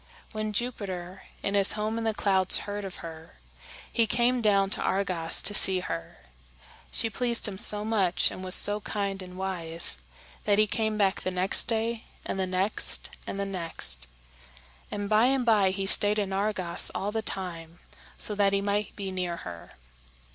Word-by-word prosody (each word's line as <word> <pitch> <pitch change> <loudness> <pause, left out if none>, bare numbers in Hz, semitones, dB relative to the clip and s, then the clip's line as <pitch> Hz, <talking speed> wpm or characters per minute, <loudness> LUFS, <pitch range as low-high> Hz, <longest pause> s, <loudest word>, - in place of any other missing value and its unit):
When 215 -1 -4
Jupiter, 195 -5 -4 0.2
in 200 - -2
his 200 -1 +5
home 215 +2 -3
in 225 - -4
the 220 - 0
clouds, 190 -3 +4
heard 205 0 -5
of 190 - -8
her, 160 -1 -11 0.6
he 230 -1 +2
came 240 +2 +1
down 200 -3 +2
to - - +2
Argos 185 -4 0
to 205 - +2
see 190 -2 +3
her. 85 - -7 0.7
She 230 - +1
pleased 235 +1 +1
him 190 -2 -6
so 210 0 +7
much, 200 -5 +1
and 185 - -9
was 185 0 +4
so 205 +1 +4
kind 200 -2 -4
and 180 0 -11
wise, 170 - -1 0.5
that 205 -1 +2
he 215 - +4
came 220 0 -2
back 195 -2 +1
the - - -2
next 185 +1 +1
day 230 0 -2 0.2
and - - -4
the 190 - -1
next 185 +3 +1 0.2
and 195 - -5
the 200 - -2
next; 165 - -3 0.8
and 205 0 -5
by 215 +2 +3
and 260 -1 +1
by 210 -4 +3
he 195 +1 -4
stayed 205 +2 +6
in 200 -2 -2
Argos 190 -3 +1
all 200 +2 -3
the 220 +1 -2
time 170 -5 -4 0.4
so 210 - +1
that 200 -1 +1
he 200 - +2
might 205 +1 -2
be 195 -2 -6
near 180 -2 -4
her. 85 -1 -10
200 Hz, 180 wpm, -27 LUFS, 185-215 Hz, 0.8 s, so